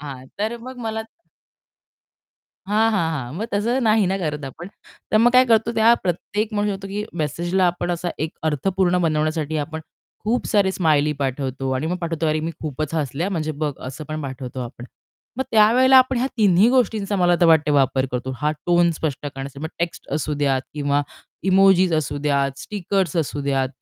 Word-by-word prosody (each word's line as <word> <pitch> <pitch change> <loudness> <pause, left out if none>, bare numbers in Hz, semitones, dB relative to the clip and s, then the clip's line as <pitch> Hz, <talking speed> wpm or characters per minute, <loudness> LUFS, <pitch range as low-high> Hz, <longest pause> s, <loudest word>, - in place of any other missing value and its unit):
हां, 135 -3 -8
तर 220 +3 -1
मग 255 +2 -9
मला 220 0 -2 1.7
हां, 220 +2 +3
हां, 170 -6 +1
हां. 130 -5 -5
मग 225 - -2
तसं 230 +6 +1
नाही 215 -3 +3
ना 190 +2 0
करत 150 -5 -3
आपण. 170 +7 -8 0.4
तर - - +3
मग 240 +2 +5
काय 255 0 +7
करतो, 225 0 +3
त्या 225 +1 +5
प्रत्येक 205 +5 -2
म्हणू 205 0 +1
शकतो, 195 0 -8
की 205 +2 -3 0.2
मेसेजला 175 +5 0
आपण 175 0 -1
असा 175 0 -2
एक 155 +1 -2
अर्थपूर्ण 180 +4 +1
बनवण्यासाठी 155 -1 0
आपण 160 +1 -7 0.4
खूप 235 +3 0
सारे 200 -3 +2
स्माइली 150 -5 +2
पाठवतो 135 -1 -3
आणि 145 - -2
मग 180 +3 -1
पाठवतो, 165 -2 -2
"अरे, 155 0 +1
मी 165 - -3
खूपच 155 +1 -4
हसले." 155 +3 -1
म्हणजे 160 -5 -2
बघ 150 -1 0
असं 135 +4 -7
पण 155 0 -5
पाठवतो 130 -2 -6
आपण. 120 0 -7 0.5
मग 265 - +2
त्यावेळेला 240 +5 +5
आपण 255 0 +3
ह्या 250 - +1
तिन्ही 205 -1 +5
गोष्टींचा 220 -5 +1
मला 175 -2 +3
तर 175 - +6
वाटतं 160 -2 +4
वापर 135 -2 +2
करतो, 125 +1 -3
हा 150 - +1 0.2
टोन 175 0 +4
स्पष्ट 150 -3 -3
करण्यासाठी 140 0 -7
मग - - -2
टेक्स्ट 170 0 -4
असू 150 0 -1
द्यात 140 -2 +1
किंवा 145 -1 +1 0.5
इमोजीस 190 -1 +5
असू 145 -2 -1
द्यात, 140 -2 0
स्टिकर्स 195 -2 -2
असू 145 -3 -1
द्यात 135 -2 0
165 Hz, 180 wpm, -22 LUFS, 145-205 Hz, 1.7 s, काय